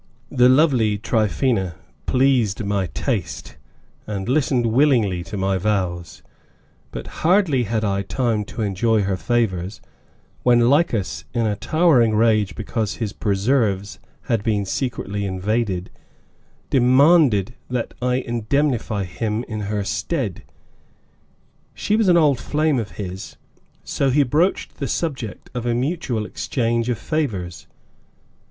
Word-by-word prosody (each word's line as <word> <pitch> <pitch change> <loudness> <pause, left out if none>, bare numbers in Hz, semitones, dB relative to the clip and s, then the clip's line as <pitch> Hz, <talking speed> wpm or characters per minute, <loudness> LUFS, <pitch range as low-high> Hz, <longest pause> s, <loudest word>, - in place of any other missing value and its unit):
The 125 -2 +5
lovely 130 -7 +3
Tryphaena 110 - 0 0.3
pleased 125 -6 +2
my 100 -2 0
taste, 65 - -4 0.5
and 100 -2 -4
listened 130 -2 +1
willingly 115 -7 +2
to 95 +5 -6
my 95 0 0
vows, 90 -4 -2 0.7
but - - -7 0.2
hardly 165 - +3
had 110 +1 -1
I 100 -1 0
had 100 - -5
time 115 -5 0
to 110 - -5
enjoy 105 +2 +1
her 95 0 0
favors 100 -4 -1 0.6
when 120 -1 +4
Lycas, 140 - 0
in 115 -1 +1
a 105 -1 0
towering 130 -5 +3
rage 110 -2 +2
because 110 -1 -3
his 110 -4 -4
preserves 100 -1 0 0.2
had 115 -3 -1
been 105 -2 0
secretly 105 -1 -3
invaded, 95 0 -2 0.8
demanded 130 - +4 0.2
that 125 -2 -3
I 125 0 +1
indemnify 120 -2 -1
him 105 +5 -3
in 110 -3 -5
her 105 -1 -1
stead. 95 - -2 1.3
She 210 - 0
was 220 -2 +2
an 175 -1 +6
old 145 -6 +3
flame 150 -1 0
of 110 -3 -5
his, 95 -2 -7 0.5
so 135 - 0
he 145 +3 +4
broached 155 +9 0
the - - -3
subject 135 -10 -4
of 120 -1 -3
a 120 - +1
mutual 130 -4 -2
exchange 115 0 -1
of 120 - 0
favors. 105 - -3
115 Hz, 130 wpm, -21 LUFS, 100-130 Hz, 1.3 s, an